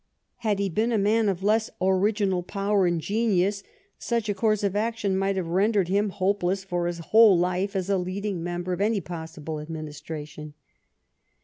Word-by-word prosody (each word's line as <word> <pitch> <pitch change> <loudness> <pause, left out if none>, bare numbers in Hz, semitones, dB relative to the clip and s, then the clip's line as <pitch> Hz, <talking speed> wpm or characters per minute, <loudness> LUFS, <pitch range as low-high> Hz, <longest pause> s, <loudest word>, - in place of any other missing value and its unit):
Had 220 -4 0
he 200 0 0
been 215 +6 0
a 225 - +2
man 210 +1 +2
of 190 -1 -3
less 220 +2 +2
original 190 0 +1
power 200 +1 0
and 175 -1 0
genius, 200 0 +1 0.4
such 235 -2 -1
a - - +2
course 215 +1 +1
of 200 -1 0
action 215 -2 0
might 195 +1 0
have 185 -2 -1
rendered 195 +1 +2
him 200 +2 +2
hopeless 190 0 0
for 175 -2 -2
his 175 -1 -3 0.2
whole 220 -4 +8
life 180 +3 0
as 190 -1 -1
a 200 -1 +1
leading 185 0 -3
member 175 +1 -3
of 180 - -3
any 215 0 +2
possible 160 -3 -6
administration. 150 -1 -7
195 Hz, 175 wpm, -26 LUFS, 175-210 Hz, 0.4 s, whole